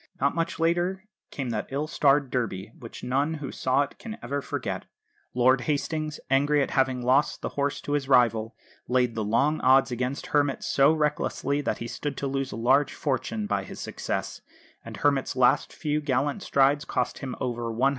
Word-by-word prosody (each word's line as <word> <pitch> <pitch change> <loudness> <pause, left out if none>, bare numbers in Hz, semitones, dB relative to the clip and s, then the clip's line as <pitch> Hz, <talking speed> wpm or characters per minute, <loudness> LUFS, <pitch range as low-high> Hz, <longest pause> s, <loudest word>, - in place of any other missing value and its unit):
Not 140 +1 +2
much 165 0 -2
later 175 +3 +1 0.3
came 130 -4 -4
that 110 -2 -3
ill 140 +3 -2
starred 145 -4 +2
Derby, 110 -5 -2
which 115 - -10
none 140 +5 0
who 145 -3 -6
saw 130 +2 +1
it 140 - -10
can 225 -1 -7
ever 140 +1 -2
forget. - - -4 0.5
Lord 130 +1 +4
Hastings, 155 +2 -2
angry 145 +2 +3
at - - -4
having 130 -2 +1
lost 130 +4 +2
the - - -1
horse 145 0 -1
to - - -6
his 145 -2 -1
rival, 115 -3 +3 0.3
laid 125 -1 +2
the 110 - -2
long 140 +9 +1
odds 130 +1 +5
against 125 +3 -2
Hermit 145 -2 +2
so 140 +2 +4
recklessly 150 -2 0
that - - -1
he 115 - -5
stood 145 +3 -4
to - - -3
lose 135 -1 -2
a - - -5
large 130 +5 +2
fortune 150 - -2
by - - -1
his - - -9
success; - - -4 0.4
and - - -8
Hermit's 140 -3 +1
last 130 +2 +3
few 150 -1 -2
gallant 145 +4 0
strides 140 -2 +3
cost 125 -1 -2
him 130 -2 -5
over 120 -2 -2
£100,000. 125 +5 +2
135 Hz, 185 wpm, -26 LUFS, 125-145 Hz, 0.5 s, odds